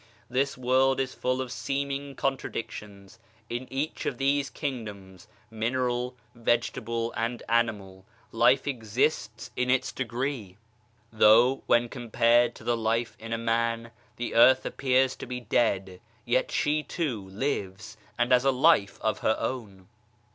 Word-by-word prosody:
This 135 +2 0
world 130 +1 +2
is 130 -1 -1
full 130 +1 -1
of 130 -2 -5
seeming 140 +3 -3
contradictions; 105 -6 -5 0.3
in 120 +2 -4
each 140 +4 -3
of - - -2
these 140 0 +1
king 135 -6 -4
doms 95 -3 -11 0.2
(mineral, 125 +2 -1 0.2
vegetable 115 0 -1
and 115 +1 -2
animal) 105 -5 0 0.3
life 130 +4 +4
exists 125 +2 -1
in 125 0 0
its 130 0 +2
degree; 120 -5 -4 0.6
though, 115 +5 +5
when 120 0 +4
compared 120 0 +2
to - - -13
the 120 - +1
life 115 +1 -1
in 115 +1 -8
a 115 - 0
man, 115 0 -1 0.2
the 120 - -4
earth 130 +3 +6
appears 130 -1 +1
to - - -8
be 125 0 -4
dead, 100 -5 0 0.2
yet 125 +2 +1
she, 150 +1 +1
too, 125 - -3
lives 105 -2 -3 0.2
and 120 +1 +1
has 125 0 +5
a 135 - +4
life 130 -6 +3
of 110 - 0
her 110 - +1
own. 105 -6 -5
120 Hz, 140 wpm, -27 LUFS, 110-130 Hz, 0.6 s, earth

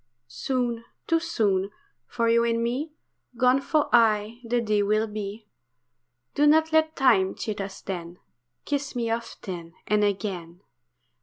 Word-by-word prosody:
Soon, 235 - -2 0.2
too 330 - +2
soon, 205 - 0 0.4
for 235 -1 -1
you 230 0 +4
and 230 0 +1
me 260 +7 -2 0.5
Gone 255 +2 +4
for 305 +1 +1
aye 225 0 +3
the 240 +1 0
day 215 -3 +1
will 215 +2 +2
be. 210 0 -6 0.9
Do 295 +1 +3
not 315 +1 +4
let 315 0 +3
time 220 -9 +3
cheat 210 -2 -4
us 195 0 -7
then, 175 -2 -6 0.5
Kiss 285 -1 -2
me 230 -2 -1
often 180 -7 -5
and 210 0 +2
again. 190 -4 -3
230 Hz, 140 wpm, -26 LUFS, 200-250 Hz, 0.9 s, you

